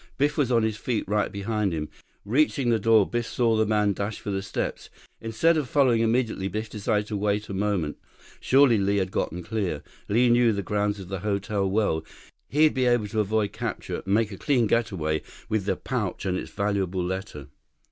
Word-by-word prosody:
Biff 145 +2 +2
was 135 -4 +1
on 115 -2 +3
his 110 -1 -1
feet, 120 -4 -2
right 105 +1 0
behind 100 -1 -1
him. 75 -1 -3 0.4
Reaching 130 +2 +2
the 115 - +2
door, 110 -1 +4
Biff 120 -1 -2
saw 115 -2 +1
the 110 -1 +2
man 105 -1 +2
dash 100 +2 -4
for 100 - -5
the 95 0 -1
steps. 95 - -4 0.3
Instead 115 +10 +2
of 145 -5 -2
following 130 -7 +3
immediately, 115 -4 +1
Biff 105 +3 -4
decided 105 0 0
to 105 - -5
wait 105 +1 -1
a - - -4
moment. 95 -6 -1 0.4
Surely 130 -4 +4
Li 100 +1 +1
had 95 -2 -1
gotten 90 -1 -2
clear. 95 -7 -2 0.3
Li 120 +4 +4
knew 120 -1 +4
the 100 -1 -2
grounds 105 0 -1
of 95 -2 -9
the 95 -1 -3
hotel 100 0 -1
well. 95 -6 +1 0.5
He'd 155 +2 +4
be 130 -1 +1
able 120 -4 +2
to 110 - -2
avoid 105 -1 +1
capture, - - -4
make 105 +2 +2
a 100 - -7
clean 130 -5 +2
getaway 90 -9 0 0.3
with 105 -3 0
the 95 -2 +1
pouch 105 -6 -3
and 95 -1 0
its - - -4
valuable 95 -3 -1
letter. 90 -6 -5
105 Hz, 200 wpm, -26 LUFS, 100-115 Hz, 0.5 s, door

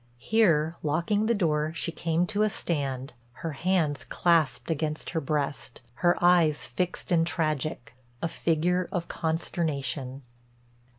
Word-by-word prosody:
Here, 165 - +2
locking 170 +8 +1
the 235 - +3
door, 155 -5 +1
she 170 - -2
came 165 +1 0
to 210 +3 -1
a 215 - +4
stand, 135 -8 -2 0.2
her 165 +5 -5
hands 160 -1 0
clasped 165 -2 +1
against 155 0 -2
her 160 - -1
breast, 140 -3 -3 0.2
her 175 0 +4
eyes 175 -4 +4
fixed 180 +10 -3
and 165 -1 +3
tragic, 155 -6 -2 0.3
a 170 - -1
figure 170 +3 0
of 175 -2 -2
consternation. 140 -5 -2
160 Hz, 130 wpm, -27 LUFS, 150-175 Hz, 0.3 s, a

